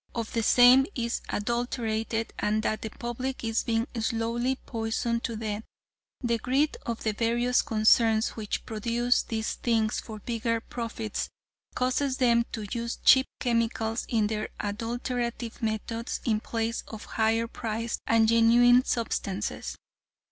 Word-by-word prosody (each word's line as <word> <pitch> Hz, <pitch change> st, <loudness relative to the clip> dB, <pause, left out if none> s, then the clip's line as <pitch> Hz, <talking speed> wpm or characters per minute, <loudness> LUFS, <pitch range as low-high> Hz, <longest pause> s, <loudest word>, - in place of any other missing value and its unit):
of 230 Hz, -2 st, -3 dB
the 230 Hz, -, +1 dB
same 250 Hz, +4 st, +7 dB
is 235 Hz, -2 st, -2 dB
adulterated 225 Hz, 0 st, -2 dB
and 215 Hz, +1 st, +1 dB
that 215 Hz, -, -1 dB
the 220 Hz, -, -4 dB
public 245 Hz, +4 st, -4 dB
is 225 Hz, 0 st, +1 dB
being 225 Hz, 0 st, 0 dB
slowly 230 Hz, +3 st, 0 dB
poisoned 230 Hz, -1 st, -2 dB
to 230 Hz, -, -2 dB
death. 215 Hz, -1 st, -3 dB, 0.6 s
The 235 Hz, -2 st, 0 dB
greed 275 Hz, +6 st, +1 dB
of 235 Hz, -1 st, -3 dB
the 215 Hz, -, +1 dB
various 240 Hz, +3 st, +2 dB
concerns 220 Hz, 0 st, +3 dB
which 215 Hz, -2 st, -4 dB
produce 235 Hz, +3 st, +1 dB
these 220 Hz, -1 st, -3 dB
things 225 Hz, -2 st, 0 dB
for 220 Hz, -2 st, -8 dB
bigger 230 Hz, +1 st, -1 dB
profits, 225 Hz, -2 st, -4 dB, 0.5 s
causes 255 Hz, +1 st, 0 dB
them 235 Hz, -2 st, +3 dB
to 215 Hz, -2 st, -4 dB
use 235 Hz, 0 st, -3 dB
cheap 265 Hz, 0 st, +7 dB
chemicals 230 Hz, -1 st, 0 dB
in 220 Hz, -3 st, +2 dB
their 215 Hz, 0 st, -2 dB
adulterative 235 Hz, +2 st, -3 dB
methods 225 Hz, +1 st, -2 dB
in 220 Hz, -3 st, +2 dB
place 230 Hz, +1 st, -2 dB
of 220 Hz, -1 st, -8 dB
higher 225 Hz, +1 st, +1 dB
priced 230 Hz, 0 st, -3 dB
and 225 Hz, -1 st, +4 dB
genuine 240 Hz, +2 st, +6 dB
substances. 210 Hz, -5 st, -2 dB
230 Hz, 135 wpm, -28 LUFS, 220-240 Hz, 0.6 s, same